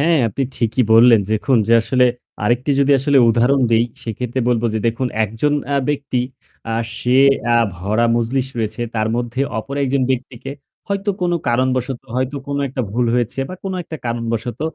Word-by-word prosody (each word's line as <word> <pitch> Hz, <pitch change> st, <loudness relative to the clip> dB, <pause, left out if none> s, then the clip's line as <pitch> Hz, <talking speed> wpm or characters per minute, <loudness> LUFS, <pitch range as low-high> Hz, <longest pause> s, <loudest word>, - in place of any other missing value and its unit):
হ্যাঁ, 165 Hz, +1 st, +3 dB
আপনি 125 Hz, +6 st, -3 dB
ঠিকই 115 Hz, +1 st, +1 dB
বললেন। 115 Hz, 0 st, +7 dB
দেখুন 110 Hz, +4 st, +2 dB
যে -, -, +4 dB
আসলে 125 Hz, +2 st, +3 dB, 0.4 s
আরেকটি 120 Hz, +6 st, +1 dB
যদি 140 Hz, +1 st, +4 dB
আসলে 140 Hz, +1 st, +3 dB
উদাহরণ 120 Hz, +4 st, +3 dB
দেই, 115 Hz, +1 st, +4 dB, 0.2 s
সেক্ষেত্রে 120 Hz, +3 st, -3 dB
বলব 120 Hz, -2 st, +1 dB
যে -, -, +1 dB
দেখুন 115 Hz, +3 st, 0 dB, 0.2 s
একজন 115 Hz, +8 st, -1 dB, 0.2 s
আ -, -, +2 dB
ব্যক্তি 140 Hz, -3 st, -1 dB, 0.5 s
আ -, -, 0 dB, 0.2 s
সে 125 Hz, +1 st, +2 dB, 0.4 s
আ -, -, +5 dB, 0.2 s
ভরা 105 Hz, +6 st, 0 dB
মজলিস 125 Hz, +3 st, 0 dB
রয়েছে। 110 Hz, +1 st, -2 dB
তার 110 Hz, -1 st, 0 dB
মধ্যে 120 Hz, +1 st, -3 dB, 0.2 s
অপর 135 Hz, +5 st, -6 dB
একজন 135 Hz, 0 st, 0 dB
ব্যক্তিকে 130 Hz, 0 st, -4 dB, 0.4 s
হয়তো 200 Hz, +1 st, -1 dB
কোন 175 Hz, -1 st, +1 dB, 0.2 s
কারণবশত 130 Hz, +1 st, 0 dB
হয়তো 130 Hz, +2 st, -1 dB
কোন 140 Hz, 0 st, -3 dB
একটা 130 Hz, 0 st, -3 dB
ভুল 120 Hz, +2 st, +1 dB
হয়েছে 120 Hz, +2 st, -1 dB
বা 185 Hz, -, -6 dB
কোন 190 Hz, -, -3 dB
একটা 160 Hz, -1 st, -8 dB
কারণবশত 115 Hz, 0 st, -3 dB
125 Hz, 170 wpm, -19 LUFS, 115-135 Hz, 0.5 s, বললেন